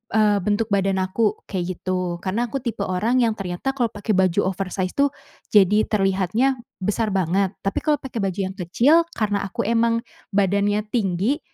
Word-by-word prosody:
eee, 210 -2 +4
bentuk 210 +2 +1
badan 195 -1 +2
aku 210 +3 0
kayak 180 -3 -2
gitu 180 -2 -2
karena 210 +6 0
aku 275 - -2
tipe 225 -4 -2
orang 215 +7 0
yang 225 - +2
ternyata 195 +8 -3
kalau 240 -4 +1
pakai 205 +1 -2
baju 190 +1 +2
oversize 185 0 -3
tuh, 280 0 +4 0.4
jadi 210 +1 +5
terlihatnya 205 +6 +1 0.3
besar 210 +3 0
banget 190 +2 +1
tapi 195 - 0
kalau 300 -1 +3
pakai 255 -3 -5
baju 190 0 -2
yang - - -13
kecil 240 - +4 0.2
karena 205 -2 0
aku 195 - -3
emang 230 0 +2 0.3
badannya 200 +1 +2
tinggi, 205 - +1
205 Hz, 165 wpm, -22 LUFS, 190-230 Hz, 0.4 s, jadi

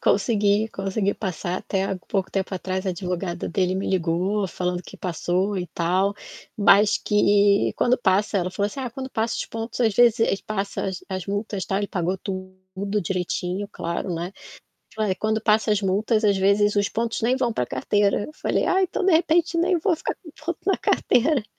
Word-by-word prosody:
Consegui, 210 -2 +2
consegui 195 0 -1
passar 180 -2 -3
até 190 -1 -2
há 195 - -2
pouco 190 -2 -1
tempo 195 0 -2
atrás, 185 +1 -3
a - - +1
advogada 180 -1 -3
dele 185 0 0
me 190 - -2
ligou 185 +3 0
falando 180 0 -2
que - - -12
passou 185 +3 -1
e 180 -1 -2
tal. 185 +5 +1 0.4
Mas 205 +1 +5
que 205 -1 +3
quando 250 +1 +3
passa 200 -1 +2
ela 180 0 -1
falou 200 +2 -1
assim: 210 +7 -6
"Ah 255 -2 -4
quando 260 +3 -7
passa 225 -1 -1
os - - -3
pontos 225 +1 -5
às 225 -4 +3
vezes 235 -1 +5
ele 200 -3 +1
passa 200 -2 -3
as 190 -3 -5
as 185 -2 -4
multas 205 -1 -3
tal" 195 - -1
ele 205 - -1
pagou 180 -1 -1
tudo 185 +2 -5
direitinho 180 +2 -2
claro, 170 0 -3
né. 170 +3 -4 0.6
Falou: 215 -3 0
"Eh, - - 0
quando 220 +2 -1
passa 215 -1 +3
as 210 0 +2
multas 215 +3 +1
às 200 -2 +3
vezes 200 +2 +3
os 205 0 +2
pontos 230 +2 -2
nem 240 +3 +2
vão 250 -3 0
pra 125 - -1
carteira". 200 +12 +1
Eu 305 - -9
falei: - - 0
"Ai 380 +1 +3
então 375 +1 -1
de 385 - +4
repente 335 +1 +3
nem 355 +2 +3
vou 340 +1 +1
ficar - - -4
com 320 - -14
ponto 345 0 -2
na 390 - +2
carteira." 265 0 +2
200 Hz, 195 wpm, -24 LUFS, 185-220 Hz, 0.6 s, Mas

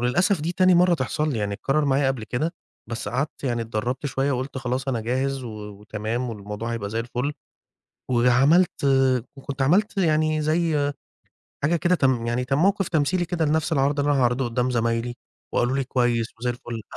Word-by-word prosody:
وللأسف 175 - +2
دي 165 +3 -2
تاني 185 0 +4
مرّة 180 0 +5
تحصَل 150 +1 -1
لي، 115 - -2
يعني 100 -1 -1
اتكرر 135 +8 0
معايا 140 0 +2
قبل 130 -5 -2
كده، 155 +10 -2 0.3
بس 115 -2 -4
قعدت 135 +6 -3
يعني 120 -3 0
اتدربت 115 +5 -3
شوية 140 +1 0
وقُلت 130 +1 -3
خلاص 130 +2 -2
أنا 120 -4 0
جاهز 130 +3 -1
و - - -5 0.2
وتمام 110 +4 -4
والموضوع 105 +2 -5
هيبقى 100 -3 -4
زَي 115 +1 -1
الفل. 125 +4 -2 0.8
وعملت 130 +9 +3 0.5
وكنت 135 0 -4
عملت 200 +9 +2
يعني 155 -3 +2
زَي 155 -2 +1 0.7
حاجة 155 +4 +2
كده 175 +2 +2
كم 130 -7 +1
يعني 120 +2 0
كموقِف 180 +9 +2
تمثيلي 175 +3 +1
كده 170 -1 -1
لنَفْس 155 +1 +1
العرض 140 0 +2
اللي 145 +1 +2
أنا 140 - +2
هاعرضه 125 +1 +2
قُدّام 125 +1 0
زمايلي 115 0 0 0.4
وقالوا 120 +2 +1
لي: 135 - 0
"كويس 120 -2 +1
وزَي 125 0 0
الفل." 120 -2 -6
135 Hz, 175 wpm, -24 LUFS, 120-155 Hz, 0.8 s, مرّة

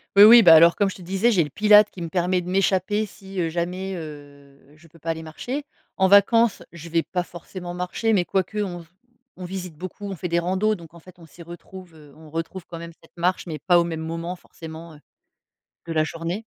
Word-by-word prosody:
Oui, 200 - +9
oui, 230 +1 +9
bah 170 -3 +9
alors 170 +1 +7
comme 200 -2 +1
je - - -10
te - - -13
disais, 195 +6 +1
j'ai 180 -7 +3
le 150 - -7
pilates 210 +6 +5
qui - - -13
me - - -4
permet 180 +2 0
de 175 - -10
m'échapper 195 +3 +1
si, 195 -1 -9
heu, 165 - -1
jamais, 180 +3 -3
heu, 145 -3 -11 0.2
je 160 +2 -20
peux 165 +1 -20
pas 165 - -6
aller 160 0 -3
marcher. 245 - -6 0.3
En 190 - +4
vacances, 205 +3 +4
je 170 -1 -11
vais 165 0 +1
pas 180 +1 -3
forcément 175 +1 -9
marcher, 180 +5 -1
mais 190 -4 +3
quoique 190 +3 -2
on 180 -4 -4
v - - -16 0.5
on 185 - -8
visite 180 -2 -7
beaucoup, 185 +5 -8
on 195 - -5
fait 180 - -5
des 170 0 0
randos, 190 +5 +1
donc 165 -3 -14
en 170 - -13
fait, 185 +2 -16
on 170 - -15
s'y 160 +2 -16
retrouve, 175 +1 -12
heu, 150 -2 -17
on 155 0 -15
retrouve 165 +3 -5
quand 170 - -8
même 170 0 -8
cette 165 - -23
marche, 180 +2 -1
mais 160 -2 -5
pas 175 +4 +3
au - - +3
même 165 -2 -4
moment 165 +2 -5
forcément, 165 -1 -11
heu, 150 - -16 0.9
de 165 - -4
la 155 - +2
journée. 165 +6 -4
175 Hz, 240 wpm, -23 LUFS, 165-190 Hz, 0.9 s, Oui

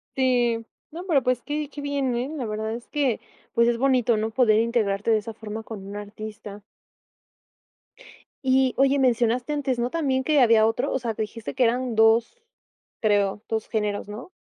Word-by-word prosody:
Sí. 245 -3 +1 0.3
No, 345 +4 -7
pero, 315 -7 +3
pues, 255 -1 0
qué 295 -1 -3
qué 290 - -8
bien, 280 -3 -1
¿eh?, 245 +3 -2
la 275 -6 -4
verdad 220 +1 -3
es 235 +1 -8
que, 275 -7 0 0.3
pues, 235 0 +4
es 240 -1 +2
bonito, 255 -2 +2
¿no?, 220 +1 -1
poder 220 -3 +4
integrarte 225 -2 0
de 220 - +5
esa 220 +1 -6
forma 220 0 -7
con 210 -4 -8
un 200 - -8
artista. 210 0 -8 1.8
Y, 260 -1 +3
oye, 275 +1 +3
mencionaste 245 +2 +1
antes, 270 -4 -1
¿no?, 240 +1 0
también 265 -4 0
que 300 -1 +3
había 225 -2 +5
otro. 225 +2 -1
O 265 - 0
sea, 235 -2 -3
dijiste 220 +2 -5
que 260 - +2
eran 245 0 0
2, 225 - +3 0.6
creo, 205 -1 +1
2 220 -1 -2
géneros, 210 -3 -2
¿no? 225 - -8
235 Hz, 180 wpm, -24 LUFS, 220-260 Hz, 1.8 s, de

